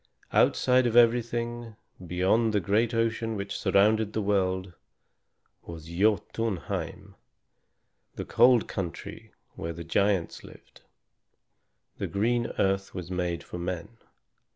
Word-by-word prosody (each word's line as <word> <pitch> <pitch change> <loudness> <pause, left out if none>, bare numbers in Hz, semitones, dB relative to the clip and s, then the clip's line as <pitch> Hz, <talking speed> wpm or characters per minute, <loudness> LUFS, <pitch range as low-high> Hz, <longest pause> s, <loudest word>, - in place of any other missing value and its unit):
Outside 125 0 +3
of 115 - -2
everything, 120 -1 +2 0.3
beyond 95 +6 +1
the 105 - +3
great 105 +5 +1
ocean 115 -1 -1
which 100 -1 -4
surrounded 105 +1 +2
the 110 - -1
world, 95 -2 0 0.9
was 80 -2 -10
Jotunheim, 105 +2 -2 1.0
the - - -5
cold 120 -1 +4
country 85 -4 -6 0.2
where 85 +1 -5
the 85 +1 -8
giants 95 +1 0
lived. - - -16 1.2
The - - -2
green 120 +4 0
earth 95 0 0
was 90 -1 -6
made 90 -2 -2
for 90 - -8
men. 90 +5 -5
100 Hz, 110 wpm, -27 LUFS, 90-115 Hz, 1.2 s, cold